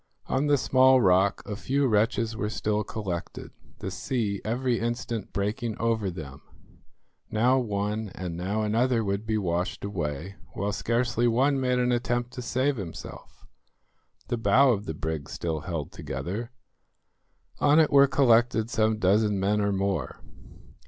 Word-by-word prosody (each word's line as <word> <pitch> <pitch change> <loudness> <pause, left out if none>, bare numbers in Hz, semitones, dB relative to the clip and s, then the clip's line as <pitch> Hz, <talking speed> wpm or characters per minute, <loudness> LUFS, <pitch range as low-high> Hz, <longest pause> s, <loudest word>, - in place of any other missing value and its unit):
On 140 +3 0
the 145 -1 +4
small 130 0 +5
rock 95 -2 +3
a 105 - -4
few 135 +6 0
wretches 115 0 +1
were 105 -2 -2
still 105 -1 -1
collected, 95 -5 -5 0.3
the - - -4
sea 110 -6 -2
every 120 +2 0
instant 120 -2 -3
breaking 105 +2 -2
over 115 -3 0
them. 75 -6 -8 0.9
Now 125 +5 +3
one 105 -1 -2
and 90 -3 -5
now 100 +5 -2
another 115 +2 +1
would 100 +2 -2
be 110 -1 +1
washed 90 0 -2
away, 90 -1 -4 0.2
while 100 0 -2
scarcely 120 +2 0
one 135 +4 +2
made 125 -1 +1
an 125 0 +1
attempt 120 0 -1
to 125 - -7
save 130 +3 0
himself. 90 -6 -9 0.8
The 120 - -1
bow 130 +4 +4
of 105 -3 -1
the 80 - -4
brig 80 -2 -4
still 80 -2 -3
held 80 -2 -5
together. 90 - -5 1.1
On 145 +2 +5
it 155 - +4
were 140 0 +7
collected 120 -4 +3
some 110 0 +2
dozen 105 +1 +2
men 105 +2 +1
or 100 0 +1
more. 95 -7 -2
110 Hz, 150 wpm, -27 LUFS, 100-120 Hz, 1.1 s, were